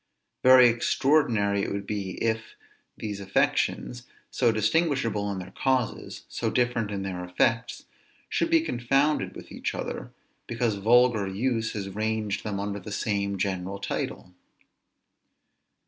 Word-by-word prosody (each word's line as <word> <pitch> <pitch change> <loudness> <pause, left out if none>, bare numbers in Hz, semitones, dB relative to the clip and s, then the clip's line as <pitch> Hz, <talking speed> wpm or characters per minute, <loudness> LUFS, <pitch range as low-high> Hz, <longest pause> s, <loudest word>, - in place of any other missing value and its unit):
Very 130 -1 +8
extraordinary 115 -4 +2
it - - -2
would 100 0 -3
be, 100 -3 -3
if 110 -1 -1 0.4
these 105 -2 -5
affections, 120 +5 0 0.2
so 120 -3 +3
distinguishable 115 -3 +1
in 100 - -4
their 95 0 -7
causes, 130 -2 -1
so - - -2
different 120 -3 0
in 100 -2 -3
their 90 -2 -4
effects, 115 +6 0 0.4
should - - 0
be 330 -1 +5
confounded 140 - +1
with - - -11
each - - -3
other, - - -5 0.4
because 115 -1 0
vulgar 115 0 +4
use 110 +3 -1
has 100 -2 -4
ranged 110 +1 -2
them 105 -2 -3
under 100 0 -3
the 100 +2 -9
same 100 -1 -1
general 95 0 -2
title. 95 -2 -4
110 Hz, 130 wpm, -27 LUFS, 100-120 Hz, 0.4 s, Very